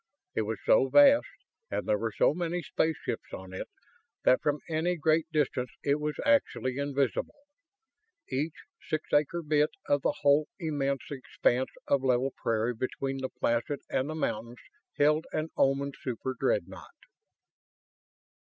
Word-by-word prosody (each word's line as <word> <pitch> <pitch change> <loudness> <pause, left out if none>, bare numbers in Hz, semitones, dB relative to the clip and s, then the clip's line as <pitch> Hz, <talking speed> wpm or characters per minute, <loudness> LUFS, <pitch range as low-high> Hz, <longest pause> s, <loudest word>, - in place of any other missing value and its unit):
It - - 0
was 110 0 -2
so 135 - +5
vast, 285 - +7 0.4
and - - -3
there 105 - +2
were 115 +1 -1
so - - +3
many 175 +1 -2
spaceships 160 -1 -2
on 95 0 -8
it, 95 - -5 0.6
that 130 - +4
from 150 -1 +1
any 165 +2 0
great 160 0 +2
distance 135 -5 0
it 140 +1 +2
was 150 0 -2
actually 140 - +2
invisible! 140 - -1 0.9
Each 150 +4 -3 0.3
six 155 -1 -3
acre 150 +4 +2
bit 150 0 +3 0.2
of 145 -1 +2
the 145 - 0
whole 145 +2 +4
immense 145 -4 -2
expanse 130 -1 0 0.2
of 140 - +3
level 130 +1 +2
prairie 115 +1 0
between 135 +3 -3
the 130 0 -3
Placid 120 +5 -1
and 130 +3 0
the 155 - -3
mountains 120 -5 -3 0.4
held 150 +2 +3
an 155 +1 -2
Oman 140 +1 +2
superdreadnought! 130 0 -3
140 Hz, 140 wpm, -29 LUFS, 130-155 Hz, 0.9 s, vast